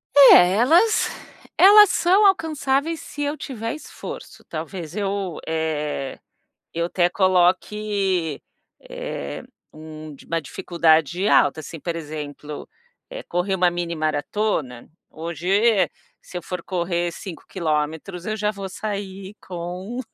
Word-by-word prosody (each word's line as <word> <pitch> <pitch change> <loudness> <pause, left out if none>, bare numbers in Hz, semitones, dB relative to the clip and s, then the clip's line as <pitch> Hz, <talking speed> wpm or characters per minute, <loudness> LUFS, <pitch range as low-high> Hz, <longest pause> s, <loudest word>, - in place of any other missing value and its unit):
É, 190 -10 +9
elas 335 - +4 0.5
elas 415 +1 +9
são 375 +3 +4
alcançáveis 320 -4 +1
se 290 - -8
eu 290 +1 -1
tiver 230 -4 -5
esforço, 310 - -9
talvez 165 +1 -6
eu, 195 -4 -2
eh, 150 -4 -2 0.5
eu 170 +1 -1
até 175 0 +2
coloque, 185 -2 +1 0.4
eh, - - -6 0.3
um 155 -1 -10
di - - -16
uma 165 0 -1
dificuldade 165 +3 +1
alta, 155 - +4
assim, 160 +2 -8
por 170 +2 -4
exemplo, 150 -2 -7 0.6
correr 180 +2 0
uma 180 -1 +3
mini 175 -1 -3
maratona, 155 - -2 0.2
hoje 165 +1 -6 0.7
se - - -10
eu - - -10
for 180 +1 -5
correr 175 -1 -1
5km, 165 -1 -4
eu 215 0 -2
já 210 0 +1
vou 195 -2 -6
sair 200 -1 -5
com 180 +6 -6
180 Hz, 115 wpm, -22 LUFS, 160-210 Hz, 0.7 s, É